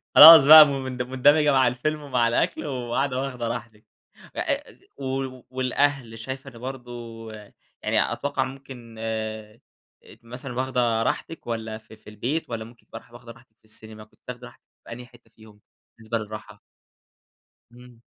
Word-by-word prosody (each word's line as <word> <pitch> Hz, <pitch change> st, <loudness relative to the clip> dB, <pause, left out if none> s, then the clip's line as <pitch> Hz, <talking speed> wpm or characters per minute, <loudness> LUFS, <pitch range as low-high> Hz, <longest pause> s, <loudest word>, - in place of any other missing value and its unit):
خلاص 160 Hz, -2 st, +11 dB
بقى 155 Hz, +1 st, +11 dB
م 140 Hz, -2 st, -3 dB
مند 130 Hz, -1 st, -5 dB
مندمجة 145 Hz, +4 st, +3 dB
مع 130 Hz, -2 st, +4 dB
الفيلم 150 Hz, +5 st, -2 dB
ومع 125 Hz, -5 st, 0 dB
الأكل 115 Hz, -, -1 dB
وقاعدة 130 Hz, 0 st, -2 dB
واخدة 125 Hz, -3 st, -4 dB
راحتِك، 115 Hz, -2 st, -7 dB, 0.5 s
أ -, -, -4 dB
أ -, -, -3 dB, 0.2 s
و 130 Hz, -1 st, -4 dB
والأهل 130 Hz, -2 st, -1 dB
شايفة 130 Hz, +4 st, -7 dB
ده 120 Hz, -3 st, -14 dB
برضه 125 Hz, -1 st, -7 dB, 0.9 s
يعني -, -, +1 dB
أتوقع 145 Hz, -1 st, -2 dB
ممكن 130 Hz, -3 st, -10 dB
آآ، 110 Hz, 0 st, -5 dB, 0.6 s
مثلًا 125 Hz, +2 st, -8 dB
واخدة 125 Hz, -3 st, 0 dB
راحتك 165 Hz, +4 st, -4 dB
والّا 110 Hz, -2 st, -4 dB
في 110 Hz, 0 st, -16 dB
في 110 Hz, -, -16 dB
البيت، 125 Hz, +10 st, -3 dB
والّا 115 Hz, -2 st, -5 dB
ممكن 115 Hz, +1 st, -18 dB
تبقي 115 Hz, -, -9 dB
راح 115 Hz, -, -24 dB
واخدة 120 Hz, -1 st, -12 dB
راحتك 115 Hz, -1 st, -20 dB
في -, -, -32 dB
السينما، 110 Hz, 0 st, -10 dB
كنت 110 Hz, -, -25 dB
تاخدِ 125 Hz, 0 st, -8 dB
راحتِك 120 Hz, -, -16 dB, 0.2 s
في -, -, -12 dB
أنهي 125 Hz, +1 st, -8 dB
حتة 120 Hz, -1 st, -22 dB
فيهم 110 Hz, -2 st, -18 dB, 0.4 s
بالنسبة 115 Hz, +1 st, -3 dB
للراحة؟ 105 Hz, -1 st, -9 dB, 1.1 s
إمم. 120 Hz, -1 st, -17 dB
125 Hz, 160 wpm, -24 LUFS, 115-135 Hz, 1.1 s, خلاص